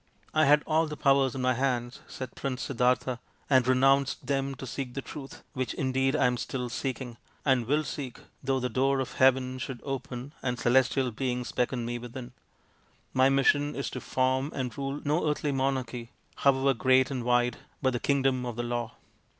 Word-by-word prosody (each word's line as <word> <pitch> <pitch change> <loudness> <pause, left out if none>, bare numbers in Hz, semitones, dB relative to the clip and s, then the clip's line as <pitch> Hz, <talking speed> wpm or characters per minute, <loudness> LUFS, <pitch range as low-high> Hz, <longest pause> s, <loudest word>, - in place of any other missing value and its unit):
" - - -34
I 155 0 +4
had 150 +1 +5
all 160 +1 +2
these 150 -1 -6
powers 135 -2 +3
in 130 - -3
my 130 0 +3
hands," 125 -1 -1
said 130 -2 -7
Prince 135 -2 -3
Siddartha, 125 -1 +1
" - - -36
and 130 -2 +5
renounced 135 +1 +3
them 135 -1 -1
to 130 - -8
seek 130 -1 -5
the 135 - -2
Truth, 140 -3 -9
which 130 -5 -2
indeed 135 +1 +1
I - - +3
am 125 0 +2
still 125 0 -3
seeking, 125 -1 -4 0.3
and 130 -5 +2
will 150 +3 +2
seek 130 -2 -6 0.2
though 135 0 +1
the 125 - -1
door 135 +3 +1
of 130 - -3
Heaven 130 0 +3
should 130 -1 -5
open 135 0 -5
and 125 -1 -1
celestial 125 +1 +2
beings 125 +1 -2
beckon 125 -1 -1
me 120 0 -3
within. 120 +1 -8 0.8
My 130 +1 +5
mission 145 +2 +3
is 140 - -3
to 130 - -5
form 130 +2 0
and 125 -4 -3
rule 140 +1 -3
no 150 +2 +1
earthly 150 0 0
monarchy 130 -3 -2 0.3
however 135 0 +3
great 130 +2 +3
and 130 -3 -2
wide, 120 0 +2 0.2
but 130 -2 +1
the 120 - -1
Kingdom 135 -2 +1
of 120 -2 -4
the 120 - -2
Law. 120 -1 -3
130 Hz, 190 wpm, -28 LUFS, 125-135 Hz, 0.8 s, had